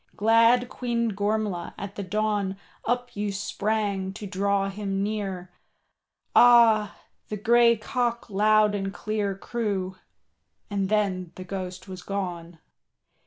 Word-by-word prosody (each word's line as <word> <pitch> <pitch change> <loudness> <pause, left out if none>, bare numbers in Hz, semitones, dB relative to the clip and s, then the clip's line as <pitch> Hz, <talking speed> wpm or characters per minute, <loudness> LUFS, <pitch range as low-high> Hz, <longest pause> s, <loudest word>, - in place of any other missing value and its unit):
Glad 230 +3 +4
Queen 235 -2 -1
Gormlaith, 205 -3 -2
at 200 -1 -6
the - - -4
dawn 205 0 -1 0.3
Up 245 +1 -1
you 205 0 -2
sprang 200 -1 -2
to 210 +1 -8
draw 200 0 0
him 195 -1 -3
near, 195 -4 -4 0.8
Ah! 230 -4 +6 0.3
the 210 - -4
grey 235 +2 +4
cock 235 +2 -2
loud 210 0 +3
and 195 -1 -2
clear 205 -1 -2
Crew, 195 -4 -3 0.7
and 195 -2 -1
then 190 -5 0
the 185 - -7
Ghost 185 0 -6
was 185 -1 -8
gone. 175 -4 -5
205 Hz, 120 wpm, -26 LUFS, 195-220 Hz, 0.8 s, Ah